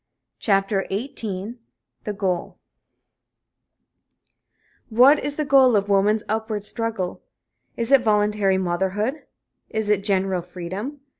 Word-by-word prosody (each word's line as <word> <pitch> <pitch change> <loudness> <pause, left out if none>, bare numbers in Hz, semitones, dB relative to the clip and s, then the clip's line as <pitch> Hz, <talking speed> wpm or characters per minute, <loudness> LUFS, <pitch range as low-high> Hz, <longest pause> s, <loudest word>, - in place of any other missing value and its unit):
CHAPTER 195 -1 +1
XVIII 215 0 -4 0.5
THE 210 - -2
GOAL 190 -4 -2 2.3
What 255 +6 +6
is 290 +1 -2
the 305 - -2
goal 265 -3 +5
of 200 0 +1
woman's 205 +2 +3
upward 220 -1 -2
struggle? 220 -4 -4 0.6
Is 235 +2 -2
it 275 -2 +7
voluntary 210 -3 +2
motherhood? 190 - -2 0.4
Is 215 -1 -1
it 200 -2 +1
general 190 -2 0
freedom? 185 - -7
210 Hz, 105 wpm, -23 LUFS, 195-230 Hz, 2.3 s, it